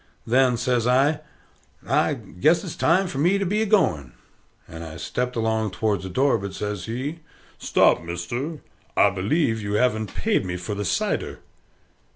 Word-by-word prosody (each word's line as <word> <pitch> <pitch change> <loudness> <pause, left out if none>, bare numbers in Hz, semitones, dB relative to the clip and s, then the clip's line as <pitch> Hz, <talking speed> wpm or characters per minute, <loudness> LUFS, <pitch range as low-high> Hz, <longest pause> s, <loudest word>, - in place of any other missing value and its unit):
Then 125 0 +3
says 120 -1 0
I, 135 +5 +3 0.7
"I - - +2
guess 155 - +1
it's 180 - -6
time 185 +4 +3
for 160 -7 -4
me 175 +7 +3
to 195 - -1
be 210 +4 0
a 220 - 0
going," 75 - +2 0.5
and 80 0 -8
I 80 -1 -8
stept 125 +7 -3
along 110 -1 0
towards 100 0 0
the 95 - -5
door; 130 +3 +2
but 100 0 -6
says 105 -3 -4
he, 135 +8 -4 0.4
"Stop, - - +3
mister: 120 - -4 0.4
I 100 - +5
believe 110 - 0
you 100 0 -3
haven't 110 -1 0
paid 220 - +1
me 90 -1 -4
for 90 +4 -5
the 105 0 -3
cider?" - - -1
115 Hz, 170 wpm, -24 LUFS, 100-145 Hz, 0.7 s, I